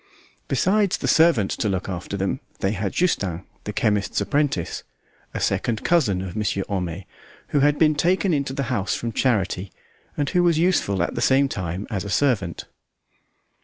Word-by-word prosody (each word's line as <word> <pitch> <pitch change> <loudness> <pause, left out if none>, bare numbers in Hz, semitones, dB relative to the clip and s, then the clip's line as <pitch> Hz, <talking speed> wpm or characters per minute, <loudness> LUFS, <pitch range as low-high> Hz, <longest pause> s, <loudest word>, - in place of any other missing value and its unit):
Besides 195 +8 +2
the - - -3
servant 160 - +4
to 115 -6 -1
look 95 -2 -2
after 95 +1 -4
them, 95 0 -1 0.2
they 95 - 0
had 100 -1 -2
Justin, 95 - 0 0.2
the 105 - -3
chemist's 105 -1 0
apprentice, 145 - -1 0.5
a - - -4
second 110 -2 -1
cousin 115 - +2
of 90 -2 -7
Monsieur 105 -2 -1
Homais, 90 -2 -3 0.4
who 145 - +2
had 145 +1 +3
been 155 -1 +4
taken 180 +4 +2
into 140 -2 0
the 140 - -2
house 100 -4 0
from 115 - -3
charity, 100 -6 0 0.5
and 145 - 0
who 180 - +3
was 170 -2 +3
useful 160 - +2
at - - -2
the 120 - -3
same 135 +3 +4
time 95 -4 -4
as 100 -3 -2
a 100 - -6
servant. 100 - 0
110 Hz, 170 wpm, -23 LUFS, 95-145 Hz, 0.5 s, servant